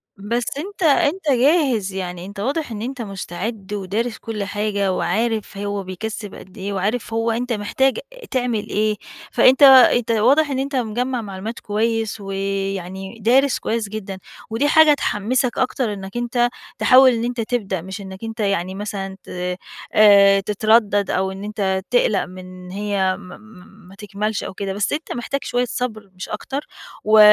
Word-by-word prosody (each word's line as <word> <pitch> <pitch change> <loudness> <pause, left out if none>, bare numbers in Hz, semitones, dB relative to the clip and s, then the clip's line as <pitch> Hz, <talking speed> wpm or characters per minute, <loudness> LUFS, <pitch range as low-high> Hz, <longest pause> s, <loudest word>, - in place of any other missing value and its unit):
بس 230 +5 -2
أنت 385 +5 -5
أنت 305 +2 +3
جاهز، 255 - +2
يعني 180 -2 -5
أنت 200 +1 -9
واضح 275 +6 -2
إن 210 -2 -5
أنت 250 +2 -4
مستعد 200 +1 -5
ودارس 210 +4 -2
كل 220 -3 -4
حاجة 205 -1 -1
وعارف 215 +3 -1
هو 200 0 -3
بيكسّب 205 +2 -6
قد 190 +3 -13
إيه 200 +1 -4
وعارف 210 +5 -2
هو 225 +1 +1
أنت 240 +2 -1
محتاج 245 +5 +1 0.3
تعمل 245 -5 -1
إيه، 215 0 +1 0.4
فأنت 260 +2 +5
أنت 255 -3 +7
واضح 265 +8 +4
إن 265 -2 -1
أنت 275 +1 -3
مِجمَّع 245 +1 -1
معلومات 205 +2 -6
كويس 220 0 -1
ويعني 195 0 -4
دارس 255 +5 +3
كويس 225 -2 -2
جدًا، 200 -2 -6 0.3
ودي 225 +6 +1
حاجة 310 0 +6
تحمِّسك 250 -1 0
أكتر 250 -3 0
إنّك 195 +2 -7
أنت 240 0 +1 0.3
تحاول 260 0 +7
إن 230 -1 -1
أنت 240 0 -2
تبدأ، 215 -6 -2
مش 190 +4 -7
إنّك 190 +1 -9
أنت 225 0 -6
يعني 190 -3 0
مثلًا 195 -1 -5
ت 180 0 -4 0.4
آآ 200 -2 +7
تتردّد، 205 0 +2
أو 190 +1 0
إن 190 +1 -8
أنت 195 -2 -1
تقْلَق - - +3
من 185 0 -11
هي 195 -1 0
م 180 - -11
م 210 -2 -16
ما 195 - -14
تكمّلش 210 +1 -3
أو - - -6
كده. 195 0 -4
بس 200 +1 -1
أنت 310 +2 -4
محتاج 275 +3 -3
شوية 245 0 0
صبر 220 -4 -4
مش 185 - -7
أكتر 275 +7 -5 0.4
و 215 +1 +5
215 Hz, 160 wpm, -21 LUFS, 195-245 Hz, 0.4 s, أنت